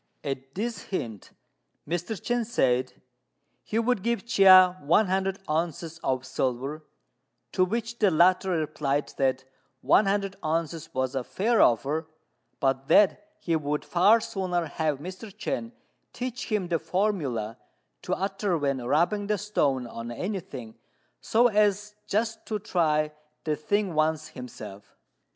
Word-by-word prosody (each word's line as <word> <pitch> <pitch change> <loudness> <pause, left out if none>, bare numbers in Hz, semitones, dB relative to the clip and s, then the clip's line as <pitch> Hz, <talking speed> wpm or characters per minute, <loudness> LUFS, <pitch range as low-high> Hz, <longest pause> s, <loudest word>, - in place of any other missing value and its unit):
At 135 -1 -5
this 230 +3 -3
hint 115 - -5 0.6
Mr. 175 +5 -3
Chên 240 -1 0
said 130 - 0 0.6
he 215 - -3
would 230 -2 +1
give 235 +2 -1
Chia 185 -5 +7
one 165 +9 +4
hundred 190 0 0
ounces 165 +1 -2
of 130 -4 -1
silver; 130 +4 -2 0.7
to 185 - +2
which 230 +4 -2
the 210 - +5
latter 185 +3 +4
replied 150 -4 -1
that 130 -1 +1 0.4
one 205 - +4
hundred 195 -1 -1
ounces 165 0 -2
was 130 0 0
a 135 -2 -1
fair 225 - +1
offer, 145 +7 +2 0.5
but 135 0 0
that 205 - +4
he 165 - -1
would 150 -1 -2
far 200 +6 +5
sooner 185 -6 -2
have 155 -1 -1
Mr. 185 +9 -8
Chên 230 +4 -4 0.4
teach 250 +1 -4
him 200 -5 0
the 165 -2 +1
formula 145 - -1 0.4
to - - -1
utter 195 -1 -1
when 140 -4 -1
rubbing 175 - +1
the 210 0 +1
stone 145 -11 0
on 115 0 -7
anything, 125 - -6 0.4
so 235 +2 +3
as 210 -1 +1
just 220 +2 -1
to 215 - -1
try 155 -7 +1 0.3
the 155 -1 0
thing 200 +4 -1
once 155 0 0
himself. 105 -7 -10
170 Hz, 135 wpm, -27 LUFS, 140-205 Hz, 0.7 s, Chia